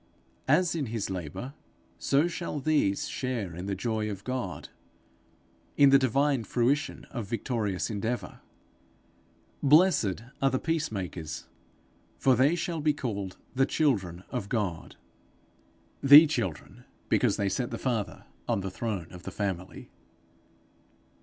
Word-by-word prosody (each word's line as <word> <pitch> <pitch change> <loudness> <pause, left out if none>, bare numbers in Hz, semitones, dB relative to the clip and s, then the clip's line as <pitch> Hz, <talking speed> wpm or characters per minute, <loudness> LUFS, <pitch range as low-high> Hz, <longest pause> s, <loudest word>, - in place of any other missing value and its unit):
As 170 +5 +3
in 155 -6 -2
his 110 -3 -3
labour, 95 - -5 0.5
so 145 +4 +2
shall 170 -3 -4
these 140 -9 +1
share 115 -10 -3
in 90 +3 -6
the 100 - -1
joy 110 +2 -2
of 100 -1 -6
God, 130 +1 -4 1.1
in 140 -1 +7
the 135 - +7
divine 135 0 +2
fruition 135 +6 0
of 120 -6 -5
victorious 110 -3 -2
endeavour. 110 -1 -3 1.2
Blessed 145 - +4 0.2
are 135 - +4
the 130 - 0
peace 160 +1 -1
makers, 90 -6 -5 0.7
for 130 -1 +4
they 135 +7 +4
shall 170 -2 -3
be 150 -1 +2
called 100 -9 -4 0.2
the 135 +2 +2
children 95 - 0
of 115 -6 -3
God 100 -8 -2 1.1
the 145 +3 +10
children 115 - -4 0.2
because - - +2
they 100 - 0
set 120 +5 -1
the - - -4
Father 115 -6 -2 0.2
on 100 - 0
the 95 0 -4
throne 100 -3 -3
of 90 - -10
the - - -6
Family. 95 -3 -4
120 Hz, 135 wpm, -28 LUFS, 100-140 Hz, 1.2 s, the